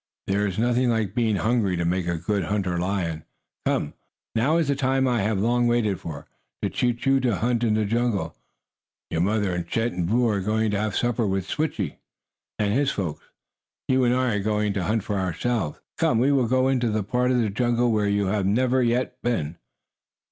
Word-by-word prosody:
"There 100 +2 +1
is 95 - -4
nothing 120 +2 +2
like 110 -5 0
being 115 -3 +1
hungry 110 -4 +1
to 85 - -1
make 90 +1 0
a 85 -1 0
good 95 +2 -1
hunter 95 -3 -1
lion. 85 -4 -2 0.4
Come, 75 - 0 0.4
now 135 +9 +2
is 165 -4 +1
the 140 - +1
time 135 -1 +1
I 120 -4 +1
have 105 +1 0
long 120 +4 +2
waited 115 -5 +1
for 80 -4 -7 0.4
to - - 0
teach 120 0 -1
you 135 0 +4
to 125 -5 +1
hunt 120 +3 0
in 110 -2 +2
the 110 -1 +1
jungle. 115 -1 -1 0.8
Your 80 - 0
mother 100 0 +1
and 85 -1 -3
Chet 115 +5 0
and 90 -1 -2
Boo 120 +5 +2
are 105 -3 +1
going 110 +2 0
to 100 - 0
have 110 0 -2
supper 120 -2 0
with 95 -1 -1
Switchie 155 +8 -2 0.6
and 105 -1 +1
his 140 +3 +2
folks. 90 - -4 0.6
You 130 0 +3
and 120 0 +3
I 130 -2 +1
are 100 - -2
going 105 -1 0
to 95 -3 -2
hunt 110 +1 0
for 105 -1 -2
ourselves. 95 0 -2 0.2
Come, - - +3
we 130 +5 +3
will 130 -4 +2
go 130 +2 +2
into 120 -5 +1
a 105 - -1
part 125 +5 0
of 130 - +2
the 110 -4 0
jungle 120 +2 +1
where 105 -2 +1
you 100 0 +1
have 95 0 0
never 125 +5 +2
yet 125 +1 0
been." 85 -10 -1
110 Hz, 210 wpm, -24 LUFS, 100-120 Hz, 0.8 s, you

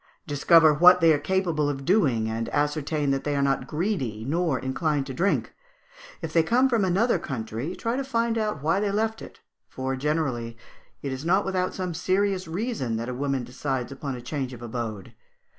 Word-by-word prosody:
Discover 155 +2 +5
what 180 +4 +7
they 165 -2 +6
are 145 - +1
capable 170 -3 0
of 135 -1 -4
doing; 135 - +2
and 115 +1 -3
ascertain 150 0 0
that 135 0 -1
they 145 -1 -1
are 140 - +1
not 135 0 0
greedy, 150 - -2
or 170 -5 +1
inclined 135 +2 -1
to 135 - -6
drink. 190 +9 0 0.7
If 160 -1 -4
they 165 - +5
come 245 +11 +3
from 230 -5 +1
another 195 +6 +2
country, 125 +4 -4
try 230 +1 -2
to 275 - -1
find 235 -3 0
out 210 -10 -2
why 165 +5 +2
they 205 0 0
left 220 +2 -1
it; - - -12 0.3
for, 130 0 -3
generally, 130 -5 -2 0.5
it 140 - -3
is 130 +1 -5
not 190 +5 +2
without 185 -1 -1
some 180 -2 -3
serious 190 +1 0
reason 175 - -2
that 115 +2 -3
a - - -3
woman 135 0 -1
decides 130 +1 -3
upon 140 -1 -5
a 125 - -8
change 130 -1 -4
of 120 -1 -10
abode. 115 -4 -5
150 Hz, 195 wpm, -26 LUFS, 130-185 Hz, 0.7 s, what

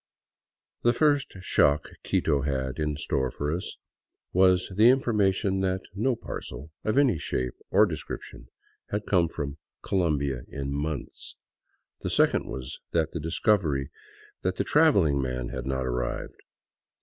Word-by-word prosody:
The 120 - +4
first 145 -1 +2
shock 70 -4 +2
Quito 70 - +1
had 65 -1 -2
in 75 -1 -1
store 65 -3 0
for 75 +4 -2
us 90 - -5 0.6
was 90 0 +4
the 110 +4 +7
information 105 -6 +2
that 95 0 0
no 115 +6 +1
parcel 70 - -7
of 110 +4 0
any 130 - +4
shape 65 -2 -2 0.2
or 105 +3 +6
description 80 -7 -7 0.4
had 105 0 -2
come 90 -4 +3
from 75 -2 -5 0.2
Colombia 75 -8 0
in 70 0 -5
months, 75 -1 -4 0.7
the - - -2
second - - +3
was 65 -1 -6
the 80 -2 +2 0.2
discovery 80 - +1 0.5
that 95 0 -1
the - - 0
traveling 100 - +4
man 65 -2 -3
had 65 0 -5
not 65 -1 -1
arrived. 60 -1 -3
80 Hz, 135 wpm, -27 LUFS, 70-100 Hz, 0.7 s, the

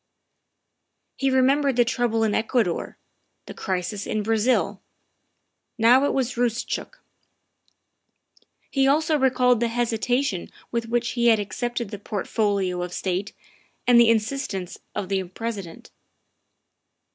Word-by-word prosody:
He 270 - 0
remembered 270 +1 +3
the 240 0 +4
trouble 235 -2 0
in 215 -2 +1
Ecuador, 220 -6 0 0.5
the - - -8
crisis 190 +2 -3
in 215 -1 -1
Brazil. 225 +3 +1 1.0
Now 245 +4 +5
it - - +1
was 255 -2 0
Eoostchook. 240 - -2 1.8
He 270 -1 +2
also 310 +3 +3
recalled 250 -2 +3
the 235 - +1
hesitation 240 -2 -1 0.2
with 235 -1 -2
which 240 0 0
he 240 -1 +1
had 225 -2 +5
accepted 235 +2 -3
the 205 - -6
Portfolio 200 -3 -1
of 180 0 -5
State 190 +2 -2 0.5
and 245 -1 +6
the 235 -1 +6
insistence 220 -5 -1 0.2
of 195 - -3
the 195 0 0
President. 195 -2 -7
230 Hz, 120 wpm, -24 LUFS, 205-250 Hz, 1.8 s, and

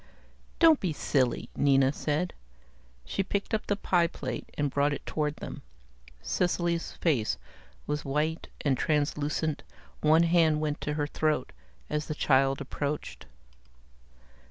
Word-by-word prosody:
"Don't 325 -3 +6
be 180 -5 -1
silly," 130 -4 0
Nina 135 -1 +4
said. 155 +5 -1 0.7
She - - -1
picked 200 +3 -2
up 220 - 0
the 205 - +2
pie 175 -4 +2
plate 130 -7 -5
and 145 -2 0
brought 145 +1 +2
it - - -6
toward 150 -1 -1
them. - - -7 0.6
Cecily's 175 - 0
face 135 -11 +1 0.5
was 150 0 -2
white 150 +4 -1
and 140 -3 +2
translucent, 150 +1 0 0.4
one 155 +2 +5
hand 165 -2 +4
went 150 -1 -2
to 150 - -2
her 150 -1 0
throat 150 -2 0 0.4
as 150 0 -2
the 155 - -3
child 135 -1 +3
approached. 145 +2 -4
150 Hz, 130 wpm, -29 LUFS, 145-165 Hz, 0.7 s, Don't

